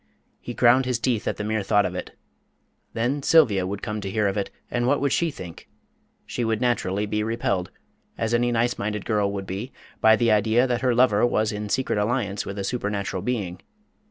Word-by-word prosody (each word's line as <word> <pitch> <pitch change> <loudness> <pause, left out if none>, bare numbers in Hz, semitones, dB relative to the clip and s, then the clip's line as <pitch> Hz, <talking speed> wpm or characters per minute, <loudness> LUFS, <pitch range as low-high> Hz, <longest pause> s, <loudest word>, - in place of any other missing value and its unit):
He 120 - -7
ground 125 +2 +5
his 125 -2 +1
teeth 120 -2 -1
at - - -1
the 105 - -3
mere 110 0 -1
thought 105 +1 +2
of - - -3
it. - - -7 0.8
Then 125 +5 -1
Sylvia 105 - +4
would 100 +1 -5
come 105 -2 -3
to 100 - -4
hear 105 +1 +1
of 100 - -1
it, 100 -2 -2 0.2
and 120 0 0
what 140 +2 +3
would 140 -1 0
she 170 - +1
think? 90 - -10 0.6
She 120 - -3
would 110 -1 0
naturally 105 -5 0
be 105 +1 -1
repelled, 105 -4 -1 0.5
as 115 +1 -1
any 120 +1 +2
nice 120 +1 0
minded 105 0 -3
girl 105 -3 +1
would 100 -1 -4
be, 100 +8 -5 0.3
by 110 0 +6
the 115 0 +2
idea 110 +4 +3
that 120 -2 -1
her 125 -2 +2
lover 115 -4 +4
was 110 -3 +2
in 105 0 -5
secret 130 -2 0
alliance 105 -2 -1
with 100 - -5
a 100 - -2
supernatural 100 -4 -2
being. 100 -6 -3
110 Hz, 210 wpm, -24 LUFS, 100-120 Hz, 0.8 s, by